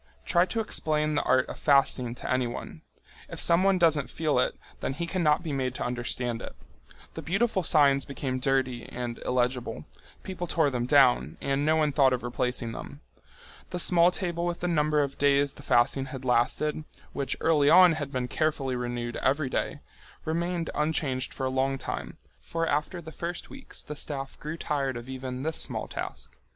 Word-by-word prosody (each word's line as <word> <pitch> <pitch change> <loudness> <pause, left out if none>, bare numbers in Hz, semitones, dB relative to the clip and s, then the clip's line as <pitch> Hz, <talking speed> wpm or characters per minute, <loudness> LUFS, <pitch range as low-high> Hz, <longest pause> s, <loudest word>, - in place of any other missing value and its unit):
Try 175 0 +3
to 230 - -2
explain 155 -7 0
the 145 - +2
art 130 0 +2
of - - -8
fasting 135 -4 +2
to - - -5
anyone! 125 -2 -3 0.5
If - - -7
someone 185 +3 +4
doesn't 160 -5 +3
feel 155 -5 0
it, 125 - 0 0.2
then - - -2
he 170 +5 -3
cannot 170 -2 +1
be 155 -4 -3
made 130 -2 -1
to - - -3
understand 120 -1 -1
it. - - -8 0.6
The - - -6
beautiful 195 +3 +1
signs 145 -5 +4
became 135 -2 -4
dirty 130 -2 0
and 120 -1 -5
illegible. 125 - -1 0.4
People 180 -2 -5
tore 155 -3 +2
them 120 -1 -2
down, 125 - +4
and 140 +1 0
no 155 - +4
one 155 -2 +2
thought 135 -2 +4
of 125 - -2
replacing 125 -1 -2
them. - - -9 0.7
The 180 - -4
small 175 0 +5
table 175 -2 -3
with 175 0 -2
the 180 - 0
number 150 -3 +2
of 140 -1 -5
days 140 0 +3
the - - -13
fasting 125 +3 +2
had 130 -1 -8
lasted, 130 +5 +1 0.3
which 140 -2 -2
early 150 -3 +3
on 180 +1 +8
had 145 -3 -4
been 125 -2 -2
carefully 140 -2 -1
renewed 120 -1 -3
every 135 0 0
day, 145 +1 -2 0.4
remained 170 +1 -1
unchanged 145 -4 0
for 135 - -4
a - - +1
long 135 +1 0
time, - - -5 0.2
for 165 0 -2
after 155 +3 -1
the 160 - -9
first 170 +2 -5
weeks 270 -1 -7
the 150 - -7
staff 135 -2 -4
grew 155 +2 -5
tired 140 -5 -1
of 120 +1 -9
even 130 0 -5
this 160 +1 -2
small - - -3
task. - - -7
140 Hz, 185 wpm, -28 LUFS, 130-160 Hz, 0.7 s, on